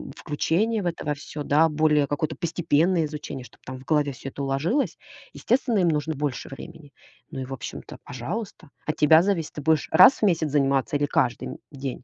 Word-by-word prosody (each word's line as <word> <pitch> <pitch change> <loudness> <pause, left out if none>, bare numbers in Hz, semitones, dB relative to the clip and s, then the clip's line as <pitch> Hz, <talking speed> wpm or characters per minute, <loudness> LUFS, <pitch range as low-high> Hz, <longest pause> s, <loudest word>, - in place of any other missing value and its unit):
включение 205 +9 0
в - - -6
это 170 -1 -3
во 150 - 0
всё. 145 +1 -7
Да, 150 +3 +4
более 150 -1 +2
какое-то 145 +2 -2
постепенное 170 0 +1
изучение, 150 -3 -7
чтоб - - -18
там 130 0 -7
в - - -14
голове 150 -2 +1
всё 135 +2 -8
это 140 - -8
уложилось. 145 - 0 0.4
Естественно, 240 -3 +1
им 175 -2 +3
нужно 155 0 -1
больше 145 -2 -3
времени. 145 +1 -11 0.4
Ну - - -6
и, - - -4
в 135 - -7
общем-то, 125 - -8
пожалуйста. 160 - -6 0.2
От 155 - -1
тебя 160 +2 +6
зависит, 185 -5 -1
ты 150 - -6
будешь 155 0 +1
раз 210 - +7
в - - -4
месяц 165 -5 +1
заниматься 140 -1 +1
или 145 - +1
каждый, 125 -4 0
м, - - -7
день? 135 -3 -6
150 Hz, 200 wpm, -25 LUFS, 140-165 Hz, 0.4 s, раз